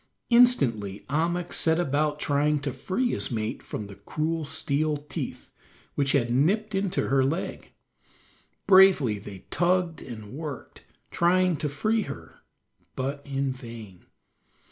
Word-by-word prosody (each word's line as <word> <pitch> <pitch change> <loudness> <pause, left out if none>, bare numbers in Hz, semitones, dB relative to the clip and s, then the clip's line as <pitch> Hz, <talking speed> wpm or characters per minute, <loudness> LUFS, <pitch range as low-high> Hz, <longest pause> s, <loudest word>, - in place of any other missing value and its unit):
Instantly 125 - +3
Ahmuk 170 +3 0
set 160 +1 +3
about 150 -1 0
trying 150 +1 +1
to 140 -2 -3
free 190 - -1
his - - -1
mate 110 -3 -3
from 105 - -6
the 100 - -10
cruel 155 +11 -3
steel 150 +2 -1
teeth, 145 0 -7 0.4
which 140 -1 +1
had 120 -4 +2
nipped 205 - +2
into 195 -1 0
her 135 0 +3
leg. 155 +7 -3 1.0
Bravely 185 - +6
they 100 -2 -10
tugged 175 -1 +1
and 110 -4 -9
worked, 145 -2 -7 0.3
trying 180 +1 +3
to 150 - -2
free 215 +11 0
her, 80 - -8 0.6
but 140 +2 -3
in 135 -1 -1
vain. 115 -7 -11
145 Hz, 130 wpm, -26 LUFS, 130-175 Hz, 1.0 s, Bravely